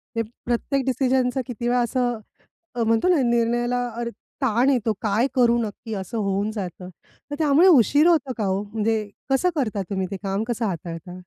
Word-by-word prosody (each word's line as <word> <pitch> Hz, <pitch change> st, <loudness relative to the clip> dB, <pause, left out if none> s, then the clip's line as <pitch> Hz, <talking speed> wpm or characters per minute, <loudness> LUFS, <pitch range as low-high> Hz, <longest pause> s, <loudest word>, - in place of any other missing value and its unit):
ते 230 Hz, -, +1 dB, 0.2 s
प्रत्येक 260 Hz, +3 st, 0 dB
डिसिजनचा 260 Hz, 0 st, +1 dB
किती 240 Hz, -1 st, -4 dB
वेळा 245 Hz, 0 st, +2 dB
असं 245 Hz, -1 st, 0 dB, 0.6 s
अ, 235 Hz, -, 0 dB
म्हणतो 225 Hz, +6 st, +2 dB
ना, 330 Hz, -6 st, +4 dB
निर्णयाला 240 Hz, +1 st, +1 dB
अरे, 235 Hz, 0 st, -2 dB, 0.3 s
ताण 250 Hz, 0 st, +2 dB
येतो. 235 Hz, -5 st, +1 dB
काय 220 Hz, +4 st, +1 dB
करू 240 Hz, -2 st, +4 dB
नक्की, 220 Hz, +1 st, -6 dB
असं 200 Hz, +4 st, -5 dB
होऊन 200 Hz, 0 st, -1 dB
जातं. 185 Hz, -3 st, -6 dB, 0.4 s
तर -, -, -2 dB
त्यामुळे 310 Hz, +4 st, +5 dB
उशीर 290 Hz, -, +5 dB
होतो 290 Hz, -7 st, +2 dB
का 215 Hz, -, -1 dB
हो? 190 Hz, +1 st, 0 dB
म्हणजे 215 Hz, 0 st, -1 dB, 0.2 s
कसं 270 Hz, +7 st, +2 dB
करता 215 Hz, -8 st, -1 dB
तुम्ही 190 Hz, -2 st, -2 dB
ते 195 Hz, -, -3 dB
काम, 195 Hz, +2 st, -1 dB
कसं 235 Hz, -1 st, -1 dB
हाताळता? 175 Hz, 0 st, -5 dB
235 Hz, 175 wpm, -23 LUFS, 205-255 Hz, 0.6 s, त्यामुळे